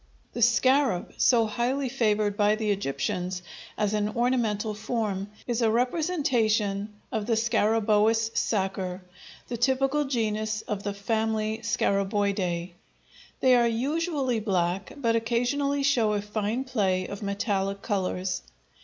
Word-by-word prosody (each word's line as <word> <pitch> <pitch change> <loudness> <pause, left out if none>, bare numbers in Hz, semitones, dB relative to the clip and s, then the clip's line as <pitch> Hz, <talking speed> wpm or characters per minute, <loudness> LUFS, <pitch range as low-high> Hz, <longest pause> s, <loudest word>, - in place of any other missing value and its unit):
The 240 - -4
scarab, 245 -3 +3
so 235 -3 +4
highly 245 +5 -1
favored 215 -5 +1
by 210 +1 +3
the 215 -1 -1
Egyptians 180 +2 -2 0.3
as 210 -1 0
an 210 0 0
ornamental 225 -3 0
form, 210 -3 -2 0.2
is 240 -1 -1
a 225 - +4
representation 230 - 0 0.2
of 220 -3 -2
the 235 - +2
scarabæus 225 0 +2
sacer, 190 -3 -1 0.4
the 240 - -4
typical 270 +4 +2
genus 215 -4 -1
of 210 -2 -4
the 205 0 -4
family 220 +1 -1
Scarabæidæ. 195 -5 0 0.7
They 255 -1 +6
are 240 -1 +4
usually 270 +1 0
black, 185 -3 -1
but 230 -5 +1
occasionally 245 +5 0
show 240 -6 +3
a 205 - 0
fine 210 +4 -2
play 195 -8 0
of 200 - -7
metallic 200 -1 -2
colors. 190 -3 -1
220 Hz, 125 wpm, -27 LUFS, 200-240 Hz, 0.7 s, They